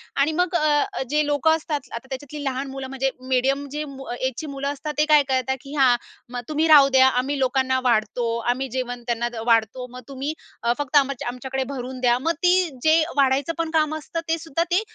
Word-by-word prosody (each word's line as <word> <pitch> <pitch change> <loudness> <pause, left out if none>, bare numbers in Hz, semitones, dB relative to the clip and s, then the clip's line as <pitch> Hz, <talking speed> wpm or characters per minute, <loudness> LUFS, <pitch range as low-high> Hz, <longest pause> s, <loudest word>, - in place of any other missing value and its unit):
आणि 280 +3 +2
मग 360 0 -1
अ, 300 -3 +3
अ, - - -3
जे 300 +1 +2
लोकं 295 +2 +3
असतात, 310 -2 -3
आता 235 +3 -7
त्याच्यातली 285 +2 -6
लहान 270 0 -2
मुलं, 270 -1 -6
म्हणजे 270 0 -1 0.2
मीडियम 270 +2 +1
जे 300 +1 -3
मु 270 -1 -9
एजची 260 +4 -3
मुलं 275 +1 -3
असतात, 300 +2 -5
ते 300 - +4
काय 295 -1 +7
करतात 265 0 0
की 280 +2 -9
हां, 260 -4 +5 0.4
मग 245 -1 -4
तुम्ही 310 +1 +1
राहू 290 -3 +8
द्या, 260 0 +7
आम्ही 265 +2 0
लोकांना 260 0 +1
वाढतो, 235 -1 +1 0.3
आम्ही 265 +2 -4
जेवण 245 -1 -4
त्यांना 235 0 0
दे 240 -1 -7
वाढतो. 230 +2 +1
मग 250 0 -9
तुम्ही 275 +2 -4 0.3
अ, 235 0 +3
फक्त 290 -1 -3
आमच्या 275 -3 +1
आमच्याकडे 265 +2 -3
भरून 255 0 -6
द्या. 240 -1 +4
मग 320 +6 0
ती 360 0 +4
जे 320 +1 +5
वाढायचं 280 +3 +2
पण 330 -1 -1
काम 310 -1 +2
असतं, 315 +2 -5
ते 330 +1 +1
सुद्धा 325 0 -1
ते 360 +4 +3
270 Hz, 215 wpm, -23 LUFS, 255-300 Hz, 0.4 s, राहू